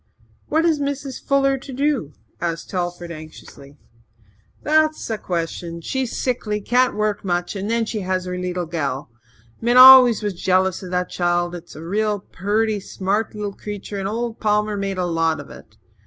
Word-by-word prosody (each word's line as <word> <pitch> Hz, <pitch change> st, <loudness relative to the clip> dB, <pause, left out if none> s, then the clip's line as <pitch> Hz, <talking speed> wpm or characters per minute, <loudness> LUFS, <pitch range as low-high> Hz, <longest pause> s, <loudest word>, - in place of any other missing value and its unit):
"What 320 Hz, +2 st, +2 dB
is 320 Hz, -3 st, +2 dB
Mrs. 280 Hz, -2 st, -4 dB
Fuller 275 Hz, -1 st, +2 dB
to 270 Hz, -, -10 dB
do?" 265 Hz, -, -1 dB, 0.3 s
asked 165 Hz, -1 st, -3 dB
Telford 175 Hz, -2 st, -3 dB
anxiously. 155 Hz, -3 st, -12 dB, 0.9 s
"That's 310 Hz, +1 st, +2 dB
the 220 Hz, -2 st, -3 dB
question. 170 Hz, -1 st, -4 dB
She's 260 Hz, +7 st, -3 dB
sickly 225 Hz, -5 st, -1 dB
can't 245 Hz, +4 st, +2 dB
work 210 Hz, 0 st, -1 dB
much 175 Hz, 0 st, -1 dB
and 200 Hz, +2 st, -3 dB
then 230 Hz, 0 st, +1 dB
she 220 Hz, -1 st, -3 dB
has 185 Hz, -1 st, -2 dB
her 180 Hz, 0 st, -4 dB
leetle 180 Hz, -1 st, -3 dB
gal. 140 Hz, -6 st, -3 dB, 0.5 s
Min 240 Hz, +2 st, +2 dB
was -, -, +11 dB
always 245 Hz, -6 st, +8 dB
jealous 185 Hz, +1 st, +1 dB
of 185 Hz, -, -8 dB
that 180 Hz, 0 st, -1 dB
child. 175 Hz, 0 st, 0 dB
It's 175 Hz, -1 st, -9 dB
a 155 Hz, -, -9 dB
real 210 Hz, +4 st, 0 dB
purty, 210 Hz, +3 st, -1 dB
smart 200 Hz, +3 st, -2 dB
leetle 205 Hz, -1 st, -4 dB
creetur 205 Hz, 0 st, -6 dB
and 195 Hz, -, -2 dB
old 230 Hz, +2 st, -3 dB
Palmer 210 Hz, 0 st, +1 dB
made 195 Hz, -1 st, -3 dB
a 180 Hz, -, 0 dB
lot 165 Hz, -2 st, 0 dB
of 145 Hz, -, -10 dB
it. -, -, -14 dB
200 Hz, 170 wpm, -21 LUFS, 175-235 Hz, 0.9 s, was